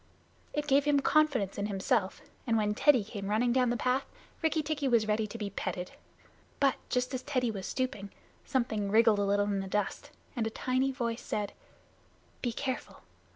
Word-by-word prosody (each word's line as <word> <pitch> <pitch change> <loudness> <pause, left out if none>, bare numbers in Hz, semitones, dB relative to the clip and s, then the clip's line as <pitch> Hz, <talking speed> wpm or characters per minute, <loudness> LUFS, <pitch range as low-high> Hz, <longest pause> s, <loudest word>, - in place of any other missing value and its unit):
It 295 0 -2
gave 280 0 +3
him 290 -1 +4
confidence 275 -12 +2
in 200 - 0
himself, 200 0 0 0.3
and 230 -1 +3
when 210 -1 +1
Teddy 255 0 +4
came 200 -1 -6
running 235 +3 +2
down 250 -1 +3
the 240 - 0
path, 255 +3 0 0.3
Rikki 320 -1 +1
tikki 295 -2 -1
was 230 -4 +3
ready 215 0 +1
to 220 - -7
be 205 -3 -4
petted. 180 -1 -4 0.7
But 275 -2 +4 0.2
just 250 +1 0
as 255 - -2
Teddy 255 -4 0
was 195 -3 -5
stooping, 255 -6 -3 0.3
something 220 -6 -1
wriggled 220 0 +5
a 200 - +2
little 205 0 +2
in 200 -1 0
the 195 - -4
dust, 210 0 -2 0.3
and 230 -3 0
a - - -1
tiny 255 +4 0
voice 235 -3 -3
said: 205 -1 -3 0.9
"Be 245 - 0
careful. 260 +2 -4
235 Hz, 185 wpm, -31 LUFS, 205-260 Hz, 0.9 s, wriggled